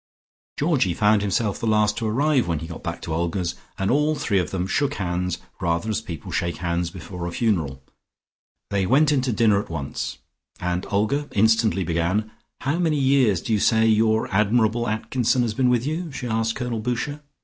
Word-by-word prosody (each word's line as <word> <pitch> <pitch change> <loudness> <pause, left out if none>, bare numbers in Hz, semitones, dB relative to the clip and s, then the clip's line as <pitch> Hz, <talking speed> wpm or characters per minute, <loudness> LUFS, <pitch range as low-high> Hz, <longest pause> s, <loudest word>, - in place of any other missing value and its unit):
Georgie 140 - +1
found 105 +1 +3
himself 105 +1 0
the 115 - -2
last 105 -1 +3
to 115 - -2
arrive, 135 +1 +2
when 85 -2 0
he 80 - -5
got 85 0 -8
back - - -5
to 80 - -4
Olga's 85 +1 -1 0.2
and 95 0 0
all 150 +3 +2
three 100 -8 +1
of 90 -4 -1
them 90 0 -2
shook 140 +8 0
hands 90 -1 -2 0.2
rather 85 +5 0
as 110 - -1
people 85 -7 -7
shake 85 -2 -1
hands 85 0 -1
before 90 -1 -7
a - - -4
funeral. 80 - -1 0.9
They 100 -2 +1
went 145 +5 +4
into 130 -3 +1
dinner 105 -2 +3
at - - -12
once 75 -4 -4 0.4
and 90 +1 -2
Olga 110 +9 0
instantly 110 -1 +3
began, 85 +6 0 0.3
"How 145 +5 0
many 160 -4 +1
years 130 - +3
did - - -8
you 110 -2 +2
say 110 +2 +3
your 110 0 +3
admirable 110 +3 +2
Atkinson 120 +3 +1
had 110 -3 -2
been 125 0 +2
with 125 0 +2
you?" 160 +2 -3
she 130 - -6
asked 115 -1 0
Colonel 125 -3 -3
Boucher. 125 +6 -3
110 Hz, 190 wpm, -23 LUFS, 90-125 Hz, 0.9 s, went